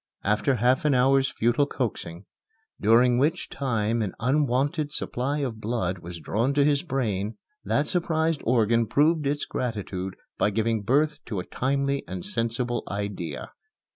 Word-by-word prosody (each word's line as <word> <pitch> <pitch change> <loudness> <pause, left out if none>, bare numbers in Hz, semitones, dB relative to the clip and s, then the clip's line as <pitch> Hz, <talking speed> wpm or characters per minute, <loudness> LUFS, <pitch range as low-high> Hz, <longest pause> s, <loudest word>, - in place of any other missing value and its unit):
After 105 +7 +2
half 125 +3 +2
an 150 -3 +3
hour's 135 +1 +4
futile 120 +5 +1
coaxing, 95 -9 -4 0.6
during 120 +3 +5
which 160 +6 0
time 115 -4 -1
an 100 -4 -2
unwonted 145 +3 +1
supply 140 +2 -2
of 115 -5 -3
blood 105 -5 -1
was 85 0 -8
drawn 115 - 0
to 145 -1 +4
his 145 -1 +3
brain, 110 - -2 0.3
that 145 - +1
surprised 165 -3 0
organ 115 -1 +3
proved 150 +4 +3
its 145 +1 -1
gratitude 100 -6 -4 0.2
by - - +3
giving 110 +1 0
birth 145 +7 +2
to 105 -5 -3
a 90 - -5
timely 140 +1 -1
and 90 -1 -6
sensible 120 +1 -1
idea. 100 -4 -4
125 Hz, 145 wpm, -26 LUFS, 105-140 Hz, 0.6 s, during